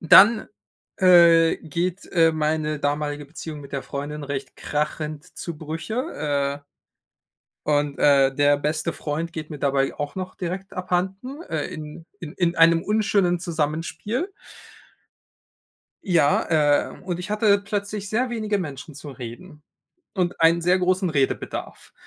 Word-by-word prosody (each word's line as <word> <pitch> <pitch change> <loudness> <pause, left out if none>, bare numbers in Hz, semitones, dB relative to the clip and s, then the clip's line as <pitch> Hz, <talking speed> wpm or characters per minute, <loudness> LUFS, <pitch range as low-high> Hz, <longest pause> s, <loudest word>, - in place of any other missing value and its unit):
dann, 215 +7 +7 0.5
äh, 170 -3 +6
geht, 175 +5 -3
äh, 165 -2 +5
meine 155 0 -1
damalige 145 0 -2
Beziehung 150 +1 -8
mit 140 -1 -12
der 140 - -2
Freundin 145 +2 -5
recht 140 -2 -5
krachend 150 +1 -3
zu 170 -2 -5
Brüche, 155 - -3
äh, 145 - -45 1.0
und, 145 -1 +1
äh, 135 -2 +4
der 145 +1 +4
beste 155 +3 -1
Freund 160 +3 -4
geht 155 -1 -6
mir 150 - -6
dabei 135 -1 +1
auch 145 -1 -4
noch 185 0 -5
direkt 185 +2 -5
abhanden, 190 - -3
äh, 155 -3 -3
in 155 +1 -8 0.2
in 155 -3 -7
in 175 -1 0
einem 165 0 +5
unschönen 200 -4 +1
Zusammenspiel. 165 - -2 1.8
Ja, 165 -6 +3 0.4
ähm, - - -14
und 180 -2 -3
ich 180 - -7
hatte 210 -1 +3
plötzlich 205 0 -4
sehr 240 +5 0
wenige 215 -3 -1
Menschen 150 -3 -6
zum 145 0 -9
Reden 135 +6 -10 0.5
und 180 -4 -1
einen 165 +1 +5
sehr 180 +2 +3
großen 185 0 +1
Redebedarf. 140 -3 -2
165 Hz, 135 wpm, -24 LUFS, 145-185 Hz, 1.8 s, dann